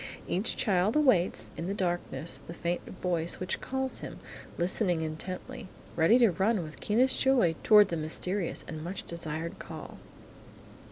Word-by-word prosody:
Each 195 Hz, +7 st, 0 dB
child 195 Hz, +1 st, +2 dB
awaits, 255 Hz, -, +2 dB
in 165 Hz, -, -4 dB
the 200 Hz, -, -2 dB
darkness, 175 Hz, -6 st, -1 dB
the 165 Hz, +5 st, -10 dB
faint 170 Hz, +1 st, -2 dB
voice 175 Hz, -2 st, -1 dB
which 185 Hz, 0 st, -3 dB
calls 265 Hz, 0 st, -2 dB
him, -, -, -7 dB, 0.4 s
listening 175 Hz, -1 st, +1 dB
intently, 185 Hz, +9 st, -5 dB, 0.3 s
ready 165 Hz, +8 st, +5 dB
to 235 Hz, -5 st, +5 dB
run 195 Hz, +2 st, +1 dB
with 155 Hz, 0 st, -10 dB
keenest 245 Hz, +5 st, +2 dB
joy 255 Hz, -11 st, +4 dB
toward 210 Hz, -2 st, +7 dB
the 170 Hz, -, -2 dB
mysterious 170 Hz, +4 st, -2 dB
and 155 Hz, -1 st, -6 dB
much 180 Hz, +3 st, -5 dB
desired 165 Hz, +1 st, -5 dB
call. -, -, -9 dB
180 Hz, 150 wpm, -29 LUFS, 170-215 Hz, 0.4 s, toward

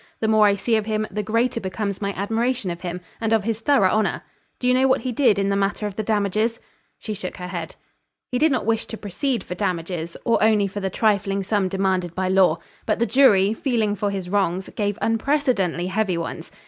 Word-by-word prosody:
The 220 Hz, -, 0 dB
more 215 Hz, -1 st, +5 dB
I 200 Hz, -, +3 dB
see 220 Hz, +3 st, +1 dB
of 215 Hz, 0 st, -3 dB
him, 215 Hz, 0 st, 0 dB
the 210 Hz, -, -2 dB
greater 230 Hz, +4 st, 0 dB
becomes 200 Hz, 0 st, -4 dB
my 200 Hz, -1 st, -1 dB
admiration 225 Hz, +1 st, -1 dB
of 170 Hz, -, -7 dB
him, 180 Hz, 0 st, -5 dB, 0.2 s
and 225 Hz, -1 st, 0 dB
of 220 Hz, -2 st, +3 dB
his 225 Hz, 0 st, -2 dB
thorough 225 Hz, -6 st, +3 dB
honor. 215 Hz, 0 st, 0 dB, 0.3 s
Do 250 Hz, -, -2 dB
you 250 Hz, -, +5 dB
know 260 Hz, +1 st, +4 dB
what 260 Hz, -, +2 dB
he 255 Hz, -, -2 dB
did 235 Hz, -4 st, +3 dB
in 200 Hz, 0 st, +1 dB
the 200 Hz, -, +1 dB
matter 200 Hz, +1 st, 0 dB
of 205 Hz, -2 st, -4 dB
the 215 Hz, -, -2 dB
damages?" 215 Hz, +2 st, 0 dB, 0.4 s
She 215 Hz, -, -5 dB
shook 190 Hz, -3 st, -6 dB
her 180 Hz, 0 st, -6 dB
head. 170 Hz, -3 st, -5 dB, 0.6 s
"He 250 Hz, -, 0 dB
did 315 Hz, 0 st, +4 dB
not 255 Hz, -6 st, 0 dB
wish 225 Hz, 0 st, 0 dB
to 220 Hz, -, -7 dB
proceed 235 Hz, -, -2 dB
for -, -, -6 dB
damages, 175 Hz, -3 st, -3 dB
or 230 Hz, -, +2 dB
only 215 Hz, -2 st, +4 dB
for 195 Hz, +1 st, -5 dB
the 195 Hz, -1 st, -2 dB
trifling 200 Hz, -1 st, +1 dB
sum 200 Hz, -1 st, 0 dB
demanded 185 Hz, -2 st, -1 dB
by 185 Hz, 0 st, -1 dB
law; 185 Hz, -4 st, +4 dB, 0.3 s
but 215 Hz, -, +1 dB
the 235 Hz, -, +2 dB
jury, 215 Hz, -4 st, +4 dB
feeling 225 Hz, -4 st, 0 dB
for 205 Hz, +1 st, -1 dB
his 195 Hz, -2 st, -4 dB
wrongs, 190 Hz, -1 st, 0 dB
gave 205 Hz, -1 st, -1 dB
unprecedently 225 Hz, -, +1 dB
heavy 190 Hz, -1 st, 0 dB
ones. 165 Hz, -, -5 dB
205 Hz, 225 wpm, -23 LUFS, 190-225 Hz, 0.6 s, more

